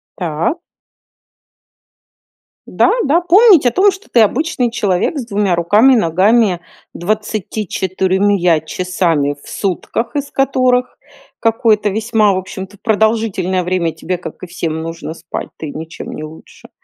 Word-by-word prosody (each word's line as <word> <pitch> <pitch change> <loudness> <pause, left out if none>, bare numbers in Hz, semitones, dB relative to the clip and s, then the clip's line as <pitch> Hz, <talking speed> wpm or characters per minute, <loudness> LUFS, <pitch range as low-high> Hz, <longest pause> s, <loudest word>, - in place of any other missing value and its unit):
Так. 170 - -2 2.1
Да, - - +2
да, 310 +5 +2
помнить 365 - +6
о - - +3
том, 395 - +4
что 385 +2 -12
ты 235 - +4
обычный 250 +2 +1
человек 205 - 0
с 250 - -5
2 200 -3 0
руками, 210 +10 +4
ногами, 190 0 +2 0.3
24 190 -2 0
часами 165 -4 -1
в - - -15
сутках, 200 - -3
из 285 -1 -3
которых 255 -2 +1 0.4
какое-то 225 -2 +2
весьма, 215 0 +1
в 185 - -1
общем-то, 190 +2 -8
продолжительное 220 -4 0
время 175 -2 -1
тебе, 175 +3 -4
как 180 - -9
и 185 - -7
всем, 165 -2 -4
нужно 165 0 -6
спать, 165 - -7
ты 155 - -6
ничем 160 +2 -8
не 155 - -7
лучше 155 +1 -13
200 Hz, 130 wpm, -16 LUFS, 175-235 Hz, 2.1 s, помнить